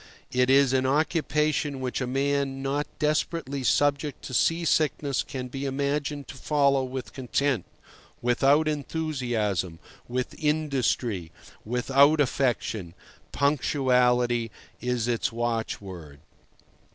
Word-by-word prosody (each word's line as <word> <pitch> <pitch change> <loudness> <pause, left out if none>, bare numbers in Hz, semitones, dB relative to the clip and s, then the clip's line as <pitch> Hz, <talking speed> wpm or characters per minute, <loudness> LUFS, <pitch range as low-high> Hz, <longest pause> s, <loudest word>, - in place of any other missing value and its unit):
It 125 0 +2
is 135 -1 +5
an 130 0 +2
occupation 150 -1 +1
which 130 0 -3
a 125 - -1
man 135 +1 0
not 140 +2 -1
desperately 150 -2 -1
subject 145 +1 +1
to - - -7
sea 165 +7 +2
sickness 150 -4 +1
can 130 -2 -6
be 135 +2 -6
imagined 140 +1 -2
to - - -8
follow 140 -1 +2
with 130 0 -6
content, 130 -3 0 0.5
without 135 +5 +3
enthusiasm, 125 - -2 0.3
with 125 +1 -3
industry, 130 - 0 0.3
without 135 +6 +3
affection. 120 -9 0 0.4
Punctuality 125 -4 +2 0.3
is 125 -2 -1
its 120 -2 0
watchword. 100 -10 -4
135 Hz, 105 wpm, -26 LUFS, 125-145 Hz, 0.5 s, is